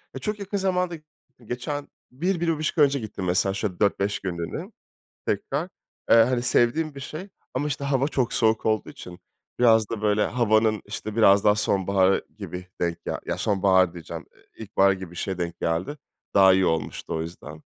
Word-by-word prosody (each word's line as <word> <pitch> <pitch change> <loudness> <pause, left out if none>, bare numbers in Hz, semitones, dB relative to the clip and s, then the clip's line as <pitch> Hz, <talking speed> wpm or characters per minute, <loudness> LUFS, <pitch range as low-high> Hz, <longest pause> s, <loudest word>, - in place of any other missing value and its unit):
Eee, - - -4
çok 210 -1 -3
yakın 200 0 -3
zamanda 180 -2 0
gittim. 135 -6 -21
Geçen 140 +5 -4 0.2
1-1,5 165 +1 -1
ay 150 - +7
önce 140 0 -1
gittim 105 -4 -6
mesela 90 +2 +1
şöyle 95 -2 -3
4-5 100 0 +1
günlüğüne 85 -3 -5 0.6
tekrar. - - -1 0.4
Eee, - - +8
hani 120 +2 +4
sevdiğim 125 +5 +2
bir 140 - -8
şey 155 +8 -7 0.3
ama 145 +3 -1
işte 145 -1 -3
hava 140 0 +1
çok 130 -6 0
soğuk 110 -1 +2
olduğu 110 -2 0
için 90 -1 -11 0.4
biraz 110 -3 +5
da, 110 -2 -4
böyle, 105 0 +2
havanın, 110 -2 +2
işte, 110 0 -6
biraz 100 -3 +5
daha 105 - +6
sonbaharı 95 -2 +2
gibi 90 0 -7
denk 85 -1 -2
gel - - -3
Ya - - -1
sonbahar 95 -3 +3
diyeceğim, 85 -3 -8
eee, - - -24 0.2
ilkbahar 100 -1 +3
gibi 95 -2 -6
bir 90 - -13
şeye 95 +1 -3
denk 85 -1 -4
geldi. 85 - -1 0.4
Daha 95 -1 +7
iyi 95 0 +3
olmuştu 80 -1 -2
o 80 - -1
yüzden 80 -2 -9
110 Hz, 180 wpm, -25 LUFS, 95-140 Hz, 0.6 s, Eee